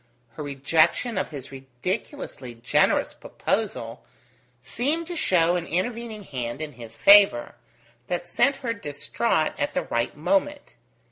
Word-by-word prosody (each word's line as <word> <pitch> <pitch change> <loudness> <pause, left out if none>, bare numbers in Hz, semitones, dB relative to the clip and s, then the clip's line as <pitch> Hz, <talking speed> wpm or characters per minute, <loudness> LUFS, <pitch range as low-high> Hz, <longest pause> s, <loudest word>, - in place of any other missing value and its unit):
Her 115 - -9
rejection 155 - +1
of 190 - -1
his 140 -4 -8
ridiculously 135 - -5
generous 115 +1 +2
proposal - - -3 0.6
seemed 260 - -1
to 350 +1 -6
show 175 - +3
an 175 -1 -3
intervening 220 +4 -3
hand 125 -7 -5
in 155 -1 -5
his 115 -3 -11
favour, 200 -12 +6 0.5
that 175 0 -3
sent 275 +10 +2
her 230 - 0
distraught 160 0 -1
at 145 - -1
the - - +1
right 115 +4 -2
moment. 290 - 0
170 Hz, 130 wpm, -25 LUFS, -, 0.6 s, favour